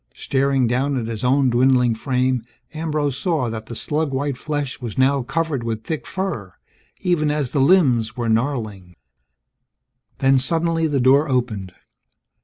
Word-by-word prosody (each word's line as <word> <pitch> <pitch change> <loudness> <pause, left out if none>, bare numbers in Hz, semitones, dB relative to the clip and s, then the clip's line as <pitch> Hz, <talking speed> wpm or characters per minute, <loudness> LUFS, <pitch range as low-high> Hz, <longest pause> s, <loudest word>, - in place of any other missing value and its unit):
Staring 135 -1 +1
down 130 +4 0
at 120 - -2
his 115 -1 -5
own 130 0 +3
dwindling 125 -1 +3
frame, 125 +1 0 0.3
Ambrose 150 -4 -2
saw 155 - 0
that 110 -1 -6
the 115 - -7
slug 150 +4 -1
white 140 0 -1
flesh 145 -1 -4
was 115 -4 -6
now 135 +1 +3
covered 155 +1 -2
with 110 -1 -3
thick 155 +5 -4
fur, 170 - -4 0.5
even 175 -5 +1
as 145 -4 -1
the 140 - +1
limbs 130 -8 +3
were 120 -1 -2
gnarling 110 -7 -2 1.2
Then, 135 0 +4
suddenly 165 +3 0
the 145 -3 0
door 135 +4 +4
opened. 110 -8 -2
130 Hz, 150 wpm, -21 LUFS, 120-150 Hz, 1.2 s, Then